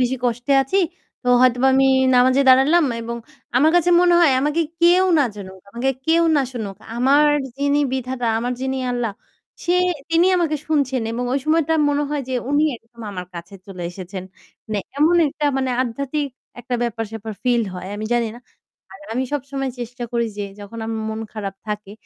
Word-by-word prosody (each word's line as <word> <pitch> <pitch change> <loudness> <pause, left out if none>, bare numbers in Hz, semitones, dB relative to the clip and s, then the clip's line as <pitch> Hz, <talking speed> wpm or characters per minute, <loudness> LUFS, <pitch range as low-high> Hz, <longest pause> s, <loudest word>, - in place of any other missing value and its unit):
বেশি 255 +1 +1
কষ্টে 245 +3 0
আছি। 325 +9 0 0.4
তো - - -11
হয়তোবা 255 +1 +4
আমি 270 0 +4 0.3
নামাজে 255 +2 +4
দাঁড়ালাম 290 +6 +6 0.2
এবং 235 +1 -5 0.4
আমার 305 +5 +5
কাছে 350 0 +3
মনে 355 -1 +4
হয় 305 -6 +5
আমাকে 300 +4 +1 0.2
কেউ 355 +2 +5
না 285 - +4
জানুক, 190 -2 -9
আমাকে 245 +4 -1 0.2
কেউ 335 +1 +4
না 280 - +3
শুনুক। 210 -5 -5 0.2
আমার 280 +4 +4 0.3
যিনি 285 +1 +1
বিধাতা, 255 -2 -2
আমার 245 +2 -2
যিনি 265 0 -2 0.2
আল্লাহ 235 -4 -2 0.5
সে 350 +1 +2 0.4
তিনি 335 +2 +4
আমাকে 325 -4 +1
শুনছেন 275 -6 0
এবং 245 +2 -2
ওই 275 - +2
সময়টা 320 0 +2
মনে 290 0 +1
হয় 290 -2 -1
যে 260 - -2 0.2
উনি 290 +1 +3
একদম 230 +1 -19
আমার 180 -1 -6
কাছে 170 +4 -9
চলে 185 -3 -8
এসেছেন। 185 +1 -7 0.5
মানে 215 - -1 0.2
এমন 320 +4 +4
একটা 295 +1 -4
মানে 260 -1 0
আধ্যাত্মিক 280 +4 -3 0.3
একটা 245 +1 -4
ব্যাপার-স্যাপার 225 -1 -4
ফিল 240 -2 +2
হয়। 180 0 -7
আমি 215 - -5
জানি 235 -1 +1
না। 240 - -12 0.5
আর 195 - -13
আমি 255 +3 -1
সবসময় 275 -1 -3
চেষ্টা 240 +1 -7
করি 235 -1 +1
যে, 205 - -2 0.2
যখন 205 +3 -9
আম 225 - -3 0.2
মন 220 0 -4
খারাপ 200 -3 -5
থাকে, 210 -1 -5
255 Hz, 180 wpm, -21 LUFS, 225-290 Hz, 0.5 s, দাঁড়ালাম